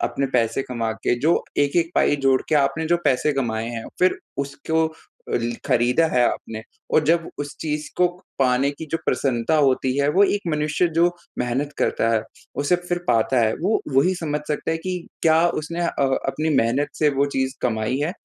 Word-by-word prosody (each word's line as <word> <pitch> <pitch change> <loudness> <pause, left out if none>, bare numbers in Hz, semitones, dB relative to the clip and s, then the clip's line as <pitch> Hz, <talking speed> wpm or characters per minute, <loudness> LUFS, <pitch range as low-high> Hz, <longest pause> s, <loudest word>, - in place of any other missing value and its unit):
अपने 140 - -2
पैसे 115 +3 +1
कमा 115 -3 -3
के 120 - +2
जो 160 +4 +2 0.2
1-1 165 +4 +2
पाई 145 - +3
जोड़ 130 -1 +4
के 155 - +2
आपने 145 +3 +1
जो 175 +1 +3
पैसे 135 +3 +2
कमाए 115 -4 -2
हैं, 115 -1 -5
फ़िर 185 0 +3 0.3
उसको 160 +3 -1 0.4
ल 120 0 0
खरीदा 125 +4 +3
है 125 -1 +4
आपने। 110 0 -5 0.3
और 155 - +5
जब 165 +1 +2
उस 145 0 -5
चीज़ 150 -1 -3
को 180 - +4 0.3
पाने 135 +1 +2
की 155 +2 -8
जो 165 - +1
प्रसन्नता 130 +3 +1
होती 135 -2 +2
है, 140 +1 +2
वो 195 +5 +5
एक 205 - +1
मनुष्य 155 +3 +1
जो 170 +1 +5 0.3
मेहनत 130 +4 -1
करता 115 - +1
है, 110 - +1 0.3
उसे 145 +5 +2
फ़िर 175 0 -3
पाता 115 +3 +3
है 110 -1 +2
वो 200 +6 +1 0.2
वही 180 +7 +4
समझ 150 -3 -2
सकता 150 +1 -2
है 160 - +1
कि 180 +2 -3 0.3
क्या 160 0 +5 0.2
उसने 170 +3 -5
अ, 170 - +1 0.4
अपनी 155 +4 -1
मेहनत 125 +6 +2
से 150 - +4
वो 140 +1 +3
चीज़ 130 0 0
कमाई 110 +1 0
है 155 +5 -1
145 Hz, 190 wpm, -22 LUFS, 125-160 Hz, 0.4 s, और